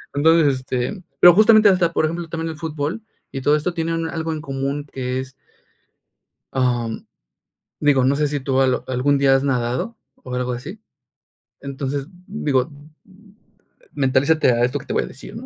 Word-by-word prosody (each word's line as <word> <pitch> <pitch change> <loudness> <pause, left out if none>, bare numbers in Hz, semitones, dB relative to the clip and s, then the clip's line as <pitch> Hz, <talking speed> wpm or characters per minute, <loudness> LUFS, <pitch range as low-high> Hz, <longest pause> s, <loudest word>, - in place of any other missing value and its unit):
Entonces, 155 -1 +4
este, 130 +9 -3 0.2
pero 175 -1 +10
justamente, 215 +1 +6
hasta 180 -3 +2
por - - +1
ejemplo, 170 +2 -3
también 165 0 -4
el 160 - -9
fútbol 160 +4 -4 0.3
y 135 - -4
todo 145 +3 +3
esto 155 +4 -2
tiene 165 0 -2
un 165 0 -2
algo 160 -1 -3
en 155 - -5
común 140 0 -3
que 130 -1 -3
es. 130 0 -10 1.2
Ah, 125 -3 0
mm, 110 - -7 0.8
digo, 145 -3 +3
no 135 +2 +3
sé 150 +1 +1
si 145 0 -2
tú 135 0 0
al 130 -1 +1
algún 130 +3 +1
día 135 -1 +4
has 135 - +1
nadado, 130 - -1 0.3
o 125 - -7
algo 125 0 -2
así. 150 - -8 0.8
Entonces, 140 0 -4 0.2
digo, 145 - 0 0.3
mm: 200 +2 -21 0.6
"Mentalízate 140 +2 +2
a 120 0 +1
esto 125 +4 0
que - - -13
te - - -4
voy - - +1
a - - -7
decir", - - -11
¿no?, - - -8
145 Hz, 180 wpm, -21 LUFS, 130-165 Hz, 1.2 s, pero